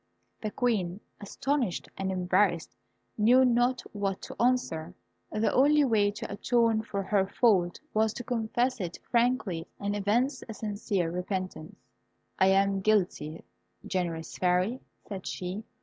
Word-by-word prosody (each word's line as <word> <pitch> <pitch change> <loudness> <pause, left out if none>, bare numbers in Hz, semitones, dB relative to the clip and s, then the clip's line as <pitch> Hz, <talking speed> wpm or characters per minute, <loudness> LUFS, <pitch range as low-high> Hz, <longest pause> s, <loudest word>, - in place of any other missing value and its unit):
The 215 - -2
Queen, 205 -6 0 0.2
astonished 245 0 -2
and 190 0 -2
embarrassed, 180 -5 +1 0.4
knew 250 +5 +6
not 245 +1 +2
what 200 -2 -2
to - - -6
answer. 185 -9 0 0.4
The 215 +1 +1
only 295 +3 +5
way 215 -6 +3
to 205 - -6
atone 230 +1 +2
for 200 -3 -4
her 195 -1 +1
fault 190 -5 +2
was 220 0 +2
to 245 - -5
confess 240 +1 -1
it 175 -2 -4
frankly, 235 -9 +1
and 200 0 -2
evince 240 +7 +1
a 220 - -5
sincere 205 -5 -2
repentance. 180 -2 -4 0.6
"I 190 - +5
am 195 0 +3
guilty, 185 -7 0 0.4
generous 170 -3 -3
Fairy," 185 +7 +2 0.3
said 195 -3 -6
she. 185 +4 -4
205 Hz, 135 wpm, -29 LUFS, 185-235 Hz, 0.6 s, knew